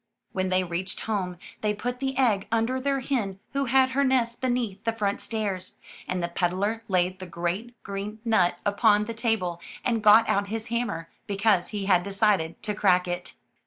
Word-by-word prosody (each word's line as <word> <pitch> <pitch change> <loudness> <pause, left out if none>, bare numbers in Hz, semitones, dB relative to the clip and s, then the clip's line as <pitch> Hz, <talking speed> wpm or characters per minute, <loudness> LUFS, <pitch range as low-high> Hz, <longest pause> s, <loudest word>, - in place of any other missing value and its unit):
When 185 0 -1
they 185 0 +2
reached 180 +2 -3
home, 190 -5 -2 0.2
they 210 -1 +1
put 245 +4 -3
the 265 0 -2
egg 225 -7 +2
under 230 +3 +1
their 275 0 0
hen 220 -8 -2
who 275 0 +1
had 260 +1 +4
her 280 +2 +2
nest 250 -3 +1
beneath 245 -6 -1
the 230 - 0
front 205 -3 -1
stairs, 205 -5 -3 0.3
and 180 -1 -2
the - - +1
peddler 190 +6 -1
laid 185 0 +1
the 185 - -7
great 175 +8 -3
green 200 +2 -5
nut 185 -6 +3
upon 210 0 +4
the 230 - -4
table 220 -7 -1 0.2
and 230 -3 +1
got 215 +2 +7
out 200 0 +1
his 220 +2 -4
hammer, 235 -9 -2 0.2
because 200 -2 +2
he 205 -2 -4
had 185 -3 +4
decided 195 -3 +1
to 215 -1 -1
crack 185 -3 +3
it. 175 0 -4
210 Hz, 185 wpm, -26 LUFS, 185-230 Hz, 0.3 s, got